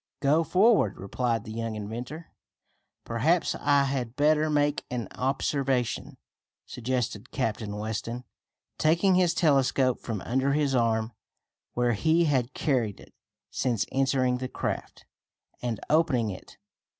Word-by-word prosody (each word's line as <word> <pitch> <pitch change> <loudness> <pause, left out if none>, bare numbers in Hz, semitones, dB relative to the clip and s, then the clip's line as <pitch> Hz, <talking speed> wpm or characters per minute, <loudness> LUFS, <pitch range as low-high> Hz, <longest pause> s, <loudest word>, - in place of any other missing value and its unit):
"Go 150 +4 +3
forward," 190 - +3
replied 115 +3 -1
the 110 - -8
young 115 0 -3
inventor. 120 +10 -6 0.7
"Perhaps 155 +10 +1
I 140 -1 +3
had 130 -3 -2
better 150 +2 +3
make 145 -1 +1
an 120 -4 -3
observation," 135 -2 -1 0.5
suggested 125 -2 -3
Captain 110 -5 -2
Weston, 110 +3 -4 0.6
taking 170 +5 +3
his 180 -2 +3
telescope 135 -4 +2
from 110 -5 -4
under 135 +3 0
his 145 -2 +1
arm, 115 -2 +1 0.6
where 120 0 +1
he 160 +10 +3
had 130 -4 0
carried 120 -9 0
it - - -16 0.4
since 120 -5 0
entering 130 -2 +1
the 130 0 -4
craft, - - -4 0.6
and 120 -3 -2
opening 140 -9 +2
it. 95 - -11
130 Hz, 125 wpm, -27 LUFS, 115-145 Hz, 0.7 s, Go